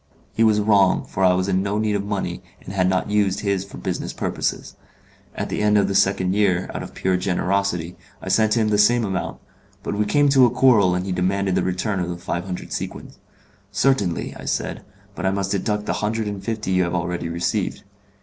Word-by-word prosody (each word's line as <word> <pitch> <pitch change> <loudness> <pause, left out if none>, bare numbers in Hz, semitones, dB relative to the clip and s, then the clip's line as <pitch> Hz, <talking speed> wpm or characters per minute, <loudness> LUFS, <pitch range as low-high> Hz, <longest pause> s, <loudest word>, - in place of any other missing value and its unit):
He 115 - +2
was 110 -2 +4
wrong, 100 -3 +3
for 95 - -3
I 90 -1 +5
was 95 +1 0
in 95 -1 +1
no 100 +1 -1
need 105 -1 0
of 100 - -1
money, 100 -1 -3 0.2
and 95 - -7
had 95 -2 +2
not 95 +2 0
used 100 -1 +1
his 100 -2 0
for 100 - -11
business - - -4
purposes. - - -3 0.6
At - - -3
the - - -2
end 105 0 +4
of 100 -1 +3
the 100 - -1
second 95 -1 +2
year, 95 -3 +1
out - - -4
of - - -9
pure 95 -1 +1
generosity, 90 -1 -1 0.2
I - - -10
sent 110 +3 +3
him 110 -2 +2
the 105 -1 +2
same 120 +2 +4
amount; 95 -2 -3 0.5
but - - -3
we 105 +1 0
came 145 +6 +3
to 135 -3 +6
a - - +1
quarrel 115 -7 +4
and 90 +1 -2
he 95 - -3
demanded 95 +1 0
the - - +2
return 95 +2 -1
of 90 -1 -2
the 85 - -4
five 85 0 -4
hundred 90 -2 -6
sequins. - - -6 0.5
'Certainly,' 100 -5 +1
I - - -9
said, - - -2 0.3
'but 95 - -7
I 95 - +2
must 100 0 -2
deduct 105 +1 -1
the - - -1
hundred 110 +1 -1
and 100 -2 -5
fifty 110 -4 -3
you 95 0 +3
have 85 0 -1
already 90 -1 -2
received. 85 +1 -2
100 Hz, 220 wpm, -22 LUFS, 95-105 Hz, 0.6 s, to